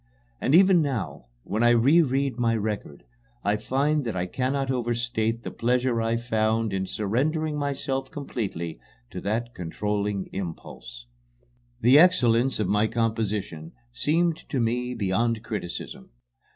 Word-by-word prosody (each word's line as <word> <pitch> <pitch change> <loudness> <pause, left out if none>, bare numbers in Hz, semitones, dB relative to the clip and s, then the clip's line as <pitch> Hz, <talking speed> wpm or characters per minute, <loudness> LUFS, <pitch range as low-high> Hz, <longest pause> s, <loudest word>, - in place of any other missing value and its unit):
And 135 - +2
even 185 -1 +6
now, 130 - -3 0.2
when 110 - -2
I 120 - +5
reread 135 +1 +3
my 115 -1 +2
record, 105 -8 -4 0.4
I 100 +1 +2
feel 140 +7 0
that 115 -7 -4
I 90 0 -1
cannot 130 +7 -1
overstate 120 -2 -1
the - - -5
pleasure 125 0 +1
I 115 +1 +1
found 110 -2 0
in 95 0 -1
surrendering 150 - -1
myself 140 -2 -2
completely 100 - -5 0.3
to 90 - -6
that 115 +4 -2
controlling 100 +2 -2
impulse. 80 -9 -7 0.8
The 125 +6 +7
excellence 130 -9 +4
of 105 - 0
my 105 +3 +2
composition 110 -8 -2 0.2
seemed 165 +6 +1
to 135 - -1
me 125 +2 -1
beyond 115 +2 0
criticism. 90 - -6
115 Hz, 130 wpm, -26 LUFS, 105-135 Hz, 0.8 s, The